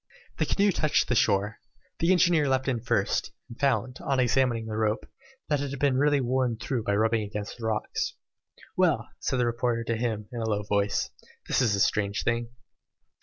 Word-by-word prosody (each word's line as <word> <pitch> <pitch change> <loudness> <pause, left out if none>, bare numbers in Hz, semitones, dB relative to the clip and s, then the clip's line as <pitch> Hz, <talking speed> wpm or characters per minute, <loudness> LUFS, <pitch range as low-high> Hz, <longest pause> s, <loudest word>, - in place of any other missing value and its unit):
The - - +1
canoe 200 0 +3
touched 155 -4 +1
the - - +3
shore. 105 -2 +1 0.4
The 165 +2 +3
engineer 170 -5 +4
leapt 130 0 +1
in 125 -3 0
first, 105 -4 0 0.2
and 115 -1 -12
found, 130 -2 0
on 135 -1 0
examining 125 -2 +2
the 110 -1 -5
rope, 110 +1 0 0.4
that 145 -2 +1
it 145 - -3
had 140 - -5
been 140 -1 +2
really 145 0 +3
worn 125 -2 0
through 120 0 -3
by 100 - +1
rubbing 110 +1 +2
against 105 +1 -6
the 110 - -3
rocks. 110 -1 -2 0.6
"Well," 160 -11 +2
said 130 - -1
the 125 - +2
reporter 120 0 0
to 115 0 -1
him, 110 -3 -2
in 120 -2 -4
a 110 - -1
low 105 -1 0
voice, 100 0 0 0.4
"this - - +2
is 110 -5 +2
a - - -2
strange 100 0 +1
thing." 115 0 0
120 Hz, 195 wpm, -27 LUFS, 110-135 Hz, 0.6 s, engineer